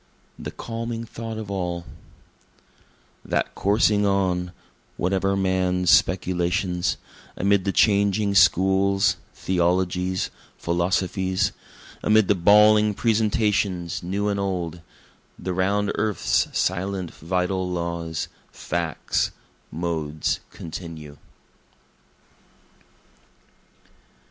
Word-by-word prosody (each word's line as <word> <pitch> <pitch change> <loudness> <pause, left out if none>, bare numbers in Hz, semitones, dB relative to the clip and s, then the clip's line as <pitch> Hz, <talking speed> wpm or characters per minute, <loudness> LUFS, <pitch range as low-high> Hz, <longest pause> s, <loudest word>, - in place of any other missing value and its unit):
The - - -5
Calming 115 0 -5
Thought 115 0 -6
of 105 -2 -6
All 90 -3 -3 1.4
That - - -1
coursing 105 0 +2
on, 95 -3 +1 0.5
whate'er 95 +2 +1
men's 95 -2 +1
speculations, 90 0 +1 0.4
Amid 100 0 +2
the 100 - +1
changing 100 0 +3
schools, 95 +2 +4 0.2
theologies, 90 +1 0 0.3
philosophies, 95 +2 0 0.5
Amid 110 -2 +4
the - - +6
bawling 105 +3 +5
presentations 105 -5 +1
new 100 +4 -2
and 100 -1 0
old, 90 -4 -3 0.6
The 90 +1 -4
round 100 +3 +1
earth's 105 -1 +1
silent 95 -1 -1
vital 90 +2 -1
laws, 85 -2 -3 0.2
facts, 85 -3 -2 0.4
modes 80 -3 -2
continue. 80 -3 -8
95 Hz, 80 wpm, -24 LUFS, 90-100 Hz, 1.4 s, the